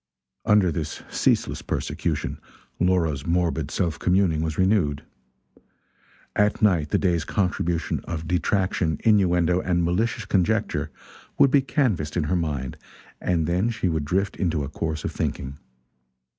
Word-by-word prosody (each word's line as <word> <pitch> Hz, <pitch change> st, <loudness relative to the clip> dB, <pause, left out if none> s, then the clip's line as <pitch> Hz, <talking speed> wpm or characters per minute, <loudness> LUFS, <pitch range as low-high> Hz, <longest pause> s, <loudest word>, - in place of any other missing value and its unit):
Under 105 Hz, -4 st, +4 dB
this 80 Hz, -2 st, -4 dB
ceaseless -, -, +1 dB
persecution, -, -, -3 dB, 0.4 s
Laura's 85 Hz, -6 st, +1 dB
morbid 85 Hz, -3 st, 0 dB
self 85 Hz, -2 st, -1 dB
communing 90 Hz, -4 st, +2 dB
was 80 Hz, -1 st, -2 dB
renewed. 95 Hz, -7 st, +2 dB, 1.3 s
At 105 Hz, 0 st, +2 dB
night 85 Hz, -8 st, +3 dB
the -, -, +2 dB
day's 85 Hz, -4 st, +1 dB
contribution 85 Hz, -2 st, -1 dB
of 80 Hz, -1 st, -5 dB
detraction, 90 Hz, -3 st, 0 dB
innuendo 90 Hz, -4 st, +3 dB
and 85 Hz, -1 st, +1 dB
malicious 105 Hz, +6 st, 0 dB
conjecture 95 Hz, -3 st, 0 dB, 0.5 s
would 135 Hz, -, +5 dB
be 140 Hz, -, +5 dB
canvassed 115 Hz, -, 0 dB
in 85 Hz, -, +1 dB
her 75 Hz, +5 st, 0 dB
mind, 75 Hz, -7 st, -2 dB, 0.4 s
and 85 Hz, -3 st, +1 dB
then 90 Hz, +7 st, +1 dB
she 110 Hz, -5 st, -1 dB
would 80 Hz, -3 st, -1 dB
drift 95 Hz, +5 st, 0 dB
into 85 Hz, -5 st, 0 dB
a 70 Hz, -, -5 dB
course 80 Hz, 0 st, -3 dB
of -, -, -2 dB
thinking. 70 Hz, +2 st, -4 dB
85 Hz, 135 wpm, -24 LUFS, 80-95 Hz, 1.3 s, would